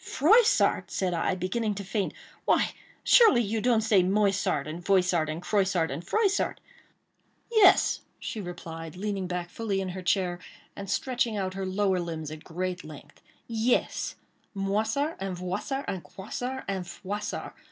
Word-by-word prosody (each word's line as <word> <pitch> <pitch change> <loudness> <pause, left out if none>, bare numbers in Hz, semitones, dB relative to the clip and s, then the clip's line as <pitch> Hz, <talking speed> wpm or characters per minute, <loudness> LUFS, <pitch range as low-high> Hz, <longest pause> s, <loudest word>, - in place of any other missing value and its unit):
"Froissart!" 430 - +4
said 185 -2 -1
I, 170 +2 0
beginning 205 +4 -1
to 200 - -5
faint, 195 +1 -2 0.3
"why, - - +3 0.3
surely 435 - +6
you 220 +1 -1
don't 235 -2 +3
say 210 -3 +4
Moissart, 195 -6 +1
and 160 +3 -6
Voissart, 180 -4 +2
and 160 +3 -4
Croissart, 190 -6 +1
and 145 +5 -5
Froissart?" 400 - +1 0.9
"Yes," 430 -5 +5 0.2
she 220 - -5
replied, 165 -2 -7
leaning 195 -1 -3
fully 180 +4 -3
back - - 0
in 185 - -4
her 185 +1 -5
chair, 180 -1 0 0.4
and 200 -1 -7
stretching 240 -4 0
out 190 -2 -2
her 190 0 -3
lower 190 -1 +1
limbs 160 -3 -4
at 155 0 -9
great 180 +1 -4
length; 145 -1 -12 0.2
"yes, 230 +1 0 0.4
Moissart, 220 +10 0
and 190 -2 -3
Voissart, 205 +10 -3
and 185 -3 -3
Croissart, 245 +7 -5
and 190 -3 -3
Froissart. 205 +4 -5
195 Hz, 150 wpm, -28 LUFS, 180-220 Hz, 0.9 s, surely